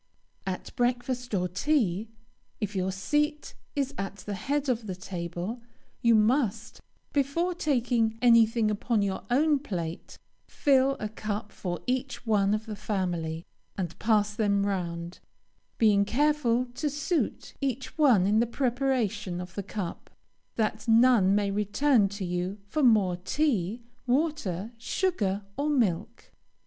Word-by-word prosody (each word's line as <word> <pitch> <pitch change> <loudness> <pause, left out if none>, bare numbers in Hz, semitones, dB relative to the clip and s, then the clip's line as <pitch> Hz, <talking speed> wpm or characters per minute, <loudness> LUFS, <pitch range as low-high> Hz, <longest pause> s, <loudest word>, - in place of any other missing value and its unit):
At 185 -1 -5
breakfast 245 0 -1
or 180 -1 +1
tea, 210 - 0 0.5
if 210 -2 -3
your 190 0 0
seat 295 - -1 0.2
is 280 -1 -1
at 195 0 -3
the 205 0 -6
head 280 +8 -1
of 235 -4 -1
the 185 - -3
table, 180 +4 -5 0.4
you 235 -1 +5
must, 225 0 +1 0.3
before 295 +6 +1
taking 240 -8 +1
anything 230 -2 +5
upon 210 +1 0
your 195 -1 -2
own 290 +4 +3
plate, 175 - -5 0.3
fill 270 -1 +3
a 215 - -2
cup 210 0 -4
for 175 -2 -4
each 255 0 -2
one 205 -2 +3
of 215 +1 -5
the 215 -2 -5
family, 175 -6 -2 0.3
and 175 -4 -4
pass 210 -1 +2
them 200 -2 +1
round, 175 -3 -3 0.6
being 210 -3 +4
careful 255 0 +2
to 295 +4 -1
suit 295 +4 -2
each 270 -1 -3
one 255 - +5
in 210 +2 +3
the 235 - +2
preparation 245 -7 -1
of 180 0 -7
the 200 - -3
cup, 195 -2 -6 0.5
that 215 0 -1
none 225 -4 +5
may 205 -1 +1
return 210 +2 +2
to 200 -1 -5
you 180 +3 -2
for 305 +10 -2
more 210 -8 +4
tea, 225 - -1 0.2
water, 245 - 0
sugar, 220 - -1
or 290 +2 0
milk. 225 - -1
220 Hz, 135 wpm, -28 LUFS, 195-255 Hz, 0.6 s, you